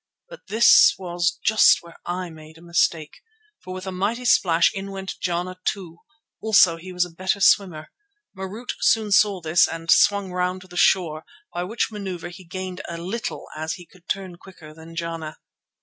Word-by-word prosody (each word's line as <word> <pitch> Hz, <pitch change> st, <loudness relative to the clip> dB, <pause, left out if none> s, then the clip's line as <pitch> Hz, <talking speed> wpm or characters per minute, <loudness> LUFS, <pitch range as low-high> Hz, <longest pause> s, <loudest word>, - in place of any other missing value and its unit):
But -, -, -13 dB
this 225 Hz, +3 st, +6 dB
was 175 Hz, -1 st, -1 dB
just 220 Hz, -4 st, +5 dB
where 170 Hz, 0 st, -15 dB
I 180 Hz, 0 st, -4 dB
made 155 Hz, 0 st, -14 dB
a -, -, -17 dB
mistake, 170 Hz, -2 st, -1 dB, 0.4 s
for 185 Hz, -, -9 dB
with 185 Hz, 0 st, -6 dB
a 190 Hz, -, -4 dB
mighty 210 Hz, +7 st, -2 dB
splash 170 Hz, -7 st, +4 dB
in 195 Hz, 0 st, -6 dB
went 195 Hz, -1 st, -6 dB
Jana 180 Hz, +1 st, -3 dB
too. 175 Hz, -5 st, -4 dB, 0.4 s
Also 190 Hz, -6 st, +5 dB
he 185 Hz, +3 st, -10 dB
was 180 Hz, 0 st, +1 dB
the 180 Hz, -, -7 dB
better 185 Hz, +4 st, -2 dB
swimmer. 180 Hz, -5 st, +2 dB, 0.4 s
Marût 195 Hz, +6 st, -8 dB
soon 220 Hz, -2 st, +2 dB
saw 200 Hz, -2 st, +4 dB
this 165 Hz, +2 st, +3 dB
and 165 Hz, 0 st, -3 dB
swung 200 Hz, -2 st, +4 dB
round 180 Hz, +1 st, -2 dB
to 185 Hz, -, -14 dB
the 180 Hz, -, -14 dB
shore, 165 Hz, -4 st, +2 dB, 0.3 s
by 175 Hz, -, -2 dB
which 225 Hz, +4 st, -2 dB
manoeuvre 185 Hz, -5 st, -6 dB
he 185 Hz, +1 st, -12 dB
gained 185 Hz, +1 st, -6 dB
a 170 Hz, -, -5 dB
little 190 Hz, +8 st, -5 dB
as 160 Hz, +1 st, -3 dB
he 175 Hz, -, -10 dB
could 180 Hz, 0 st, -23 dB
turn 190 Hz, -3 st, -3 dB
quicker 165 Hz, -5 st, -14 dB
than 165 Hz, +1 st, -13 dB
Jana. 165 Hz, -2 st, -5 dB
180 Hz, 180 wpm, -23 LUFS, 170-195 Hz, 0.4 s, this